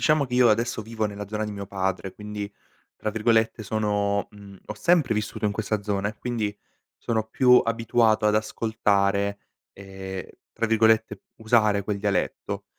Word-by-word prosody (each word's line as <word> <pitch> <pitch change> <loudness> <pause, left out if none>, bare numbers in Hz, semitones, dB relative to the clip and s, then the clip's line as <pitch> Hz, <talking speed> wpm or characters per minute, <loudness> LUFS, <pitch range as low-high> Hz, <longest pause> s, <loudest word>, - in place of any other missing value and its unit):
Diciamo 155 -2 +3
che 125 - -4
io 125 -1 +6
adesso 115 +1 +1
vivo 110 0 -3
nella 100 -1 -7
zona 110 +1 -2
di 105 - -5
mio 100 -1 -6
padre, 95 -1 -2
quindi 105 -1 -6 0.4
tra 110 - -3
virgolette 110 +1 +1
sono 105 -1 0
mhmm, 100 -2 -13
ho 105 - -5
"sempre" 140 +1 +2
vissuto 105 0 -3
in 105 - +2
questa 110 0 -2
zona 100 -1 -1
e 110 - -9
quindi 110 -4 -2 0.4
sono 110 -2 -1
più 125 0 +6
abituato 115 -1 +2
ad 105 - +3
ascoltare 100 -2 +1 0.3
ehm, 95 -1 -8 0.3
tra 115 - -1
virgolette 110 -2 +2
"usare" 110 -3 +2
quel 100 0 -2
dialetto. 100 -3 -2
105 Hz, 160 wpm, -25 LUFS, 100-110 Hz, 0.4 s, io